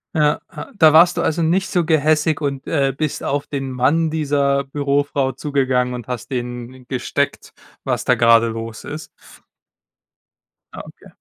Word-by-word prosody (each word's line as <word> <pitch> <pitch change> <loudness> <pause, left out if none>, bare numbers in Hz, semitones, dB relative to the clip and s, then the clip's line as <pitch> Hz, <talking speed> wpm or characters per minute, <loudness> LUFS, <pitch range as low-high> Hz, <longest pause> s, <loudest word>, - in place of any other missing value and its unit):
Ja, 150 -1 +2 0.2
ja - - -8
da 155 -4 +6
warst 175 +2 +6
du 170 - +1
also 165 +1 0
nicht 185 +4 +1
so 175 -2 +1
gehässig 155 -1 +2
und, 140 -2 -3
äh, 140 -4 +1
bist 155 -2 -2
auf 145 0 -1
den 135 -2 -4
Mann 150 +6 +1
dieser 140 -3 0
Bürofrau 140 -1 -1
zugegangen 130 -4 0
und 120 -1 -7
hast 125 +2 -6
dem 125 0 -6
gesteckt, 130 -2 -2 0.3
was - - -2
da - - +4
gerade 115 0 +5
los 115 0 -6
ist? 155 +1 -7 1.7
Ah, - - -7
okay. - - -15
140 Hz, 155 wpm, -19 LUFS, 125-155 Hz, 1.7 s, da